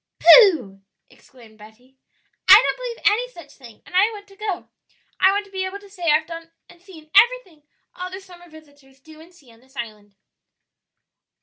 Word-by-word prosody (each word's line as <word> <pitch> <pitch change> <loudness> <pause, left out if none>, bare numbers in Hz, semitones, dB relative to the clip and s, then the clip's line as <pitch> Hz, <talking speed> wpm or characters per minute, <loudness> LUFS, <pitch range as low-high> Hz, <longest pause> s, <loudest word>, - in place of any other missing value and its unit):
"Pooh!" 320 - +5 0.3
exclaimed 230 -5 -21
Betty; 225 +5 -19 0.5
"I 385 - +10
don't 440 - +3
believe - - -8
any 485 +4 +1
such 340 -9 -15
thing, 235 -5 -17
and - - -18
I 395 +4 +4
want 410 -2 -11
to 390 - -18
go; 400 -3 -6 0.5
I 380 - +4
want 405 +1 -2
to 400 - -21
be 380 -1 -4
able 375 +1 -6
to 405 0 -18
say 350 -4 -4
I've 305 +1 +2
done 330 0 -11 0.2
and 345 - -20
seen 325 -5 -17
everything 385 -12 +2 0.3
other 365 +1 -8
summer 355 -2 -17
visitors 285 -4 -20
do 310 +3 -17
and 335 +2 -18
see 290 -9 -22
on 225 - -23
this 265 +3 -27
island." 210 -5 -9
335 Hz, 185 wpm, -21 LUFS, 270-390 Hz, 0.5 s, I